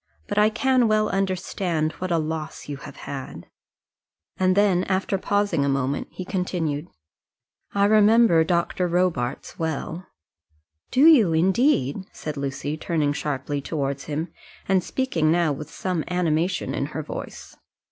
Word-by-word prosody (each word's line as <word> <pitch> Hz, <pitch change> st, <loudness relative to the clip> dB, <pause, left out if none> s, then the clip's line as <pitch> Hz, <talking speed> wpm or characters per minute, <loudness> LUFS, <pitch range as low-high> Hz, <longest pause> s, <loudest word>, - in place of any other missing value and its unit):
"But -, -, 0 dB
I 210 Hz, +1 st, +5 dB
can 255 Hz, +1 st, +2 dB
well 215 Hz, 0 st, +2 dB
understand 185 Hz, -4 st, -1 dB
what 185 Hz, -, -3 dB
a 170 Hz, -, +2 dB
loss 155 Hz, 0 st, -4 dB
you 145 Hz, -1 st, -5 dB
have -, -, -10 dB
had." 130 Hz, -, -7 dB, 0.9 s
And 185 Hz, 0 st, +2 dB
then, 195 Hz, -3 st, +4 dB
after 190 Hz, 0 st, 0 dB
pausing 205 Hz, -7 st, +1 dB
a 140 Hz, -, +1 dB
moment, 135 Hz, 0 st, -1 dB
he 185 Hz, -, -7 dB
continued, 175 Hz, -5 st, -2 dB, 0.9 s
"I 200 Hz, 0 st, +4 dB
remember 215 Hz, -4 st, +5 dB
Dr. 175 Hz, +2 st, 0 dB
Robarts 170 Hz, -8 st, -1 dB
well." 160 Hz, +2 st, -3 dB, 0.8 s
"Do 260 Hz, -, +1 dB
you, 240 Hz, -, +7 dB
indeed?" 185 Hz, -, +2 dB
said 150 Hz, -1 st, -5 dB
Lucy, 140 Hz, +2 st, -3 dB
turning 155 Hz, -3 st, 0 dB
sharply 145 Hz, -1 st, -3 dB
towards 140 Hz, -2 st, -3 dB
him, 155 Hz, +3 st, -3 dB, 0.4 s
and 190 Hz, -2 st, +2 dB
speaking 175 Hz, -13 st, 0 dB
now 170 Hz, -2 st, +2 dB
with 145 Hz, +2 st, -6 dB
some 180 Hz, -2 st, -2 dB
animation 175 Hz, 0 st, 0 dB
in -, -, -1 dB
her -, -, -5 dB
voice. -, -, -8 dB
170 Hz, 140 wpm, -24 LUFS, 150-195 Hz, 0.9 s, you